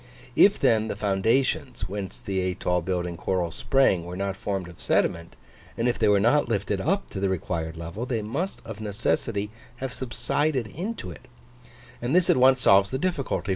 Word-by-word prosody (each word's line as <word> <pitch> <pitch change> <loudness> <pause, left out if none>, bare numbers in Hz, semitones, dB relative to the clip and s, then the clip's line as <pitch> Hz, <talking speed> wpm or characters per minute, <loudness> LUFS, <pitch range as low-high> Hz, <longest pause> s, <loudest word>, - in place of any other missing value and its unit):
If 200 +8 +6
then 110 -5 +3
the - - -3
foundations, 115 +2 0
whence 100 0 -6
the 95 -1 -2
atoll 90 -1 0
building 90 -1 -2
corals 90 -3 -1
sprang, 130 -10 +2
were 90 +1 -7
not 100 0 -2
formed 95 -2 -3
of 85 - -13
sediment, 85 0 0 0.4
and 115 - +1
if 120 - 0
they - - +3
were 100 -1 +5
not 120 +5 +3
lifted 100 -2 -1
up 195 +5 -1
to 95 - -4
the 100 0 +1
required 80 -3 -3
level, 85 +9 -5
they 115 -4 -1
must 145 - -3
of 110 -2 -8
necessity 105 0 -1 0.2
have 130 0 -5
subsided 130 +1 0
into 185 - -5
it; 130 - -13 0.7
and 120 +6 0
this 180 -1 +5
at - - +2
once 130 +1 +5
solves 100 -1 +5
the 130 - -2
difficulty. 145 - -2
105 Hz, 180 wpm, -26 LUFS, 95-130 Hz, 0.7 s, If